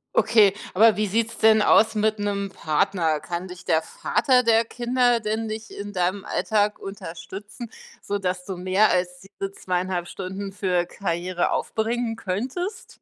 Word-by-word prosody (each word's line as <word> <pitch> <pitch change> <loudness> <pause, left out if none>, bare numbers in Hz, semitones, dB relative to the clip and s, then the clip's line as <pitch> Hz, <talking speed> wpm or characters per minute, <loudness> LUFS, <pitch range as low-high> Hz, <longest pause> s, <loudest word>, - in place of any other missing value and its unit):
Okay, 210 -4 +5 0.2
aber 220 +3 +6
wie 210 0 0
sieht's 225 +3 -1
denn 220 -1 +5
aus 220 +2 +5
mit 215 0 +1
'nem 200 -1 -2
Partner? 160 -1 0
Kann 175 +3 -5
dich 180 0 -11
der 160 -2 +2
Vater 250 - +1
der 230 0 +4
Kinder 245 +1 +1
denn 220 +1 -2
nicht 220 0 -6
in 205 0 -7
deinem 185 +1 -1
Alltag 210 -1 0
unterstützen, 200 +4 -8 0.3
sodass 185 -3 -3
du 190 - -5
mehr 185 +4 +3
als 180 0 -1
diese 195 0 -7
2,5 180 -2 -2
Stunden 195 +2 -6
für 180 -3 0
Karriere 175 -1 -2
aufbringen 225 +1 -1
könntest? 255 - -4
200 Hz, 150 wpm, -24 LUFS, 185-220 Hz, 0.3 s, aber